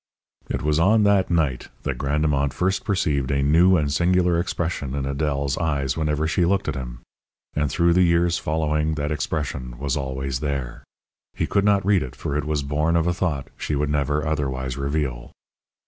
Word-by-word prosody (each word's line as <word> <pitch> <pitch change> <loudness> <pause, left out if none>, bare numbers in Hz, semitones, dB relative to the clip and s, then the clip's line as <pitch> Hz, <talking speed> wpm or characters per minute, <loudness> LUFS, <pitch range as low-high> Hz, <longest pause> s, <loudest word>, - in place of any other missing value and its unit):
It - - -2
was 75 +1 +2
on 105 +6 +4
that 100 -2 +3
night 75 -8 0
that - - -3
Grandemont 70 -1 +1
first 95 +6 0
perceived 80 - 0
a 70 -1 +1
new 85 +6 +5
and 75 -3 0
singular 90 0 +2
expression 85 -6 -2
in 70 - -2
Adèle's 70 0 -1
eyes 70 -5 0
whenever 75 -1 0
she 85 +2 +1
looked 95 +3 +1
at 75 - 0
him. - - -7 0.5
And 75 -1 0
through 85 +2 +3
the 90 - +4
years 85 0 +3
following 75 0 0
that 75 0 -2
expression 70 -5 -3
was 70 +2 -2
always 65 -1 -3
there. 70 -4 -4 0.5
He - - 0
could 100 0 +1
not 100 -2 +3
read 100 -3 +3
it, 65 -1 -6
for 70 - -4
it 75 - -1
was 75 -2 -1
born 75 +4 0
of 85 -1 +2
a 85 - +1
thought 80 -7 -2
she 75 - -2
would 75 +1 0
never 75 +1 0
otherwise 65 -4 -2
reveal. 70 -3 -3
75 Hz, 185 wpm, -23 LUFS, 70-85 Hz, 0.5 s, new